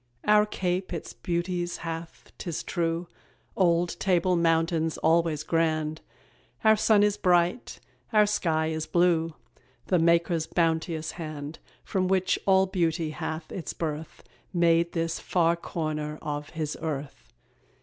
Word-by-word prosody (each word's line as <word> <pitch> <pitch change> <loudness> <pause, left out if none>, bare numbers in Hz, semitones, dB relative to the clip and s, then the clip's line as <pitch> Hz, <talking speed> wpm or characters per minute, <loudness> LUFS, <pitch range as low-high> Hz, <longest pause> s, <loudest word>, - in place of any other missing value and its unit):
Our 210 0 +5
Cape 185 -2 -2
its 170 - -6
beauties 175 +6 -2
hath, 165 0 -7
'tis 170 -3 -4
true: 170 0 -1 0.5
Old 175 -1 +2
Table 180 -1 +2
Mountain's 165 -1 +1
always 160 -2 +2
grand, 155 -1 0 0.6
Our 220 0 +6
sun 215 -1 +4
is 210 0 +2
bright, 180 +5 +1 0.3
our 215 -2 +5
sky 160 -6 0
is 160 0 -3
blue; 165 -2 +2 0.5
The 180 - +2
Maker's 170 -1 +2
bounteous 160 -1 0
hand, 155 -2 -7 0.2
From 185 -1 0
which 190 0 +1
all 190 0 +5
beauty 170 -4 0
hath 160 +1 -5
its 180 - -5
birth, 155 -1 -5 0.3
Made 170 -1 +3
this 165 -1 -1
far 170 -2 +2
corner 155 -3 -4
of 145 -1 -4
His 155 -2 -3
earth. 140 -4 -5
170 Hz, 130 wpm, -27 LUFS, 160-180 Hz, 0.6 s, Our